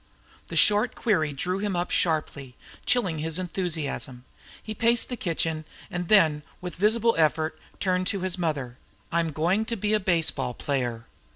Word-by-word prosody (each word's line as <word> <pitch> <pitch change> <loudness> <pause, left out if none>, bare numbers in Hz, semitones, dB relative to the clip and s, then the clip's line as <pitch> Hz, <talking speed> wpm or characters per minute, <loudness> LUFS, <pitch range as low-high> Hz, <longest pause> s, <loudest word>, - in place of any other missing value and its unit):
The - - -7
short 210 +4 +4
query 170 -10 +1
drew 180 +7 -2
him 205 -2 -1
up 175 0 -1
sharply, 150 -6 -1 0.3
chilling 190 -11 +1
his 160 +1 0
enthusiasm. 160 -8 -3 0.4
He 215 - -5
paced 230 +2 +2
the 250 - -2
kitchen, 165 -6 -1 0.3
and 175 0 -3
then, 160 -8 +5 0.2
with 180 -1 -6
a - - -14
visible 230 +2 +4
effort, 155 0 +1 0.2
turned 185 -1 +1
to 200 -3 -1
his 185 -1 0
mother. 145 -8 -3 0.3
"I 170 - +2
am 165 -1 0
going 175 +8 +1
to 230 - -2
be 210 0 0
a 215 - +4
baseball 170 - +1
player." 120 -5 -2
175 Hz, 170 wpm, -26 LUFS, 155-205 Hz, 0.4 s, then